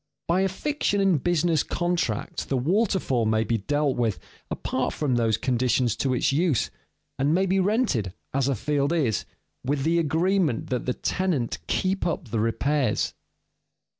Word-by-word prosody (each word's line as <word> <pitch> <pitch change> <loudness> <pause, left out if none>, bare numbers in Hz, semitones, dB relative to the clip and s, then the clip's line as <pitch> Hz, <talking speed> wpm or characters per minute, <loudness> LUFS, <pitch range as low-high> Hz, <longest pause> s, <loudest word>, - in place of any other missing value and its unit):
By 175 +3 +2
a 195 - +2
fiction 245 0 -1
in 190 -6 +3
business 170 0 +2
contracts 175 - -1
the 135 - -1
waterfall 160 - +1
may 110 0 +2
be 115 +1 0
dealt 145 +5 0
with 115 -4 +1 0.3
apart - - -2
from 145 -4 0
those 115 -2 +2
conditions 125 -2 +1
to 130 -2 0
its 125 - +2
use, 150 -5 +1 0.5
and 145 +4 +2
may 190 +2 +3
be 190 +1 +2
rented, 190 - +1 0.2
as 135 0 +1
a 140 - +1
field 145 +5 0
is, 135 - 0 0.4
with 135 +1 -1
the 165 +3 +2
agreement 165 - +1
that 125 -1 -2
the 125 - 0
tenant 175 -11 -1
keep 190 0 0
up 160 -6 -3
the 110 - -1
repairs. 125 +2 0
145 Hz, 160 wpm, -25 LUFS, 120-175 Hz, 0.5 s, in